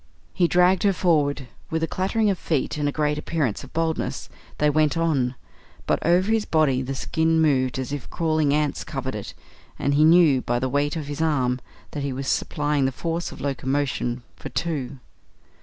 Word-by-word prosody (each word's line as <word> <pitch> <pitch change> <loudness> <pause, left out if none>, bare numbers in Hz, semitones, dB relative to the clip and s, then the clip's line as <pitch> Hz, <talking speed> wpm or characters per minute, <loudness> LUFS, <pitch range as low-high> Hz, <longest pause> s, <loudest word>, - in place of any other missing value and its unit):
He 175 -3 +3
dragged 180 +2 +4
her 200 -1 +3
forward. 145 -7 +1 0.2
With 160 0 -1
a - - +1
clattering 200 +4 +1
of 185 - -3
feet 155 -5 -1
and 145 -1 +1
a - - -2
great 150 0 0
appearance 150 -8 -2
of - - -12
boldness 160 0 -2 0.3
they 150 - +2
went 155 +1 +2
on, 140 -7 +1 0.5
but - - 0
over 180 +5 +3
his 225 -1 +2
body 150 -8 +2
the 135 +1 -4
skin 160 +3 +1
moved 130 -5 +2
as 130 +1 -4
if 145 -3 -5
crawling 155 -3 +1
ants 150 -1 0
covered 135 -2 -4
it, 105 -2 -7 0.4
and 140 - 0
he 150 +2 +4
knew 160 -5 +6
by 120 0 -1
the 130 +2 -1
weight 145 +4 0
on 155 - -3
his 145 +2 -5
arm 130 -6 +1 0.3
that 145 - -4
he 140 -1 -2
was 135 +1 -5
supplying 145 -1 0
the 130 - +1
force 165 +5 -3
of - - -10
locomotion 135 -3 -1
for 145 - -7
two. 140 -2 -3
150 Hz, 190 wpm, -24 LUFS, 135-165 Hz, 0.5 s, knew